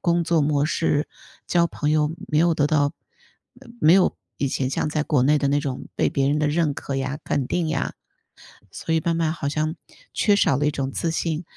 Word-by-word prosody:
工 170 -1 +1
作 165 0 +2
模 145 -1 +1
式， 155 -2 0 0.4
交 170 -1 +3
朋 150 -2 -2
友 150 -1 +2 0.2
没 150 - +1
有 170 +1 +3
得 145 -2 +2
到 145 -1 +2 0.9
没 155 +2 +6
有 190 -1 +3 0.2
以 140 - 0
前 130 0 -1
像 150 - -1
在 150 0 -1
国 145 -6 +2
内 150 +2 +4
的 145 - 0
那 145 +1 +2
种 135 -3 -5
被 - - +2
别 135 0 +1
人 150 - +1
的 150 -1 +1
认 150 -1 +1
可 135 - -4
呀， 135 +1 -3
肯 135 - -1
定 170 +3 -1
呀。 155 - -2 0.8
所 165 - -3
以 - - +3
慢 170 +1 0
慢 165 -1 +1
好 140 -4 -3
像 155 +2 -1 0.4
缺 205 -1 +3
少 140 -9 +3
了 145 - 0
一 - - +2
种 135 -2 -3
自 165 +4 -2
信， 165 0 -2
150 Hz, 235 characters per minute, -23 LUFS, 145-165 Hz, 0.9 s, 没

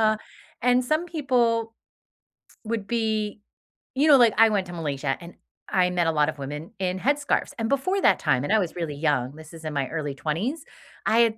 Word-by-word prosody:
da." - - -10 0.4
And 250 +1 +3
some 310 +7 0
people 240 -8 0 0.9
would 215 -3 -3
be 220 -2 -1 0.5
you 290 +4 +3
know, 285 -3 +8
like, 235 -4 +5
I 225 - +8
went 195 -3 0
to 175 - -8
Malaysia 145 -4 -2
and 175 0 -11 0.4
I 180 -1 +3
met 175 -2 +1
a - - +3
lot 150 -1 +2
of - - -5
women 150 +4 -6
in 185 0 -1
headscarves. 285 +3 0
And 225 - 0
before 370 +9 +1
that - - +5
time, 145 -4 +1
and 210 - 0
I 220 - +5
was 180 -4 -2
really 165 -5 -3
young, 140 -3 0
this 160 0 -12
is 160 -1 -11
in 155 - -3
my 140 -2 -1
early 150 -3 -3
20s, 195 - -2 0.4
I 225 - +3
had 225 -2 +3
195 Hz, 205 wpm, -25 LUFS, 155-235 Hz, 0.9 s, know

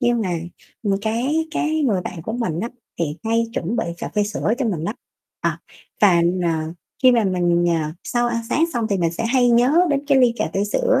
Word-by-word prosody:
Nhưng 240 -2 +2
mà, 185 - -2 0.5
ừm, 200 -2 +1
cái 265 +9 0
cái 310 0 0
người 210 -9 +2
bạn 170 -2 -6
của 220 - -4
mình 185 -9 -2
á, 230 - -2 0.3
thì 150 -3 -2
hay 230 +1 +2
chuẩn 205 +3 -2
bị - - 0
cà - - -4
phê 210 - +3
sữa 210 +1 -1
cho 265 - 0
mình 180 -8 -1
lắm. 210 +6 -2 0.5
À, - - -1 0.4
và, 180 -5 +5 0.2
ờ, 160 -1 -1 0.3
khi 255 -1 +7
mà 230 -3 +3
mình, 175 -2 +2
à, 160 -2 -1
sau 240 0 0
ăn 230 -1 -2
sáng 310 +6 +2
xong 235 -2 0
thì 200 - +2
mình 165 -2 +1
sẽ 225 - -2
hay 245 +1 +3
nhớ 240 +4 +4 0.2
đến 285 0 0
cái 280 -2 +4
ly 250 -2 +5
cà 160 - -1
phê 195 - +1
sữa - - +2
225 Hz, 230 wpm, -21 LUFS, 175-245 Hz, 0.5 s, khi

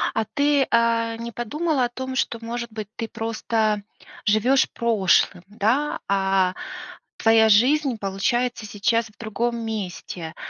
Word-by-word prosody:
А 220 - +1
ты, 285 +1 +2
а, 230 -1 +2
не 235 +1 -6
подумала 270 +5 -1
о - - -3
том, 260 +1 -5
что, 235 - 0
может 235 0 -4
быть, 215 -2 -6
ты 225 - -4
просто 220 -2 -1 0.4
живешь 230 +6 +3
прошлым, 195 -5 +2
да, 225 +8 0
а 190 -2 +2 0.6
твоя 225 0 +5
жизнь, 255 +4 +4
получается, 215 +4 -1
сейчас 225 +3 0
в 210 - -22
другом 235 +2 -2
месте? 180 -6 -5
225 Hz, 130 wpm, -23 LUFS, 210-240 Hz, 0.6 s, твоя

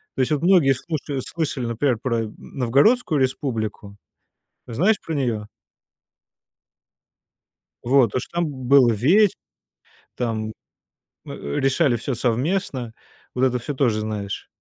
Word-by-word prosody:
То - - 0
есть 130 - 0
вот 150 -1 +1
многие 170 -7 +5
слушали 140 +1 -4
слышали, 150 -5 -3
например, 120 +2 0
про 115 -3 -1
Новгородскую 145 - +2
республику. 110 -6 -3 0.7
Знаешь 180 - +2
про 160 - -4
нее? 115 -7 -2 2.3
Вот 125 -3 +3
то, - - 0
что 125 - -7
там 175 - +1
был 130 -2 +4
вече 170 - +4 0.8
там, 110 -3 -2 0.7
э, - - -8 0.3
решали 135 -1 +2
всё 120 +3 -3
совместно, 125 - -1 0.4
вот 125 - -1
это 125 -1 +1
всё 145 +5 -5
тоже 120 -6 +1
знаешь? 105 -2 -4
130 Hz, 120 wpm, -22 LUFS, 115-145 Hz, 2.3 s, многие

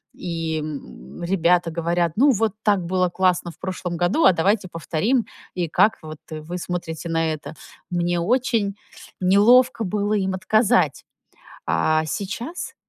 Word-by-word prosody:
и, 165 -3 -3
м, 145 - -8
ребята 175 -2 +2
говорят: 170 0 0
ну 275 +6 +5
вот 225 -3 +1
так 200 -4 +2
было 185 0 +1
классно 180 -1 +1
в - - -16
прошлом 185 -2 -4
году, 180 - +1
а 190 - +8
давайте 190 +3 +1
повторим 175 - -1 0.3
и 175 -2 -2
как 205 +7 +3
вот 155 -1 -9
вы 155 +3 -6
смотрите 170 -2 -5
на 165 -1 0
это. 155 - -7 0.4
Мне 175 0 0
очень 225 -1 0 0.4
неловко 230 +6 +5
было 205 +2 -1
им 190 -2 0
отказать. 215 +3 +2 0.6
А, 155 - +2
сейчас, 210 - -5
180 Hz, 140 wpm, -22 LUFS, 165-205 Hz, 0.6 s, а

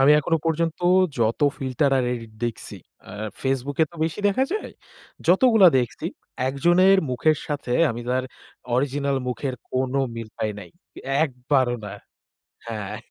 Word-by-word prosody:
আমি 135 +2 +6
এখনো 165 +2 +1
পর্যন্ত 165 0 0 0.4
যত 115 +3 +1 0.2
ফিল্টার 135 +1 0
আর 125 - +1
এডিট 115 -2 -7
দেখছি। 120 - -5 0.3
আ - - -9 0.3
FaceBook 135 +1 -2
এ - - +6
তো - - -13
বেশি 165 +5 -3
দেখা 260 +7 +2
যায়। 430 - -4 0.5
যতগুলা 200 +1 +6
দেখছি 120 -5 -3 0.4
একজনের 175 +8 +4
মুখের 150 +5 +2
সাথে 145 -4 -3 0.2
আমি 115 +1 -5
তার 130 0 0 0.5
অরিজিনাল 140 +1 0
মুখের 130 +1 -3 0.2
কোন 130 0 -1 0.2
মিল 115 -1 -6
পাই 110 - -1
নাই। 90 -4 -10 0.5
একবারও 130 -2 0
না। 100 - -7 0.8
হ্যাঁ। 105 -2 -5
135 Hz, 140 wpm, -24 LUFS, 120-160 Hz, 0.8 s, আমি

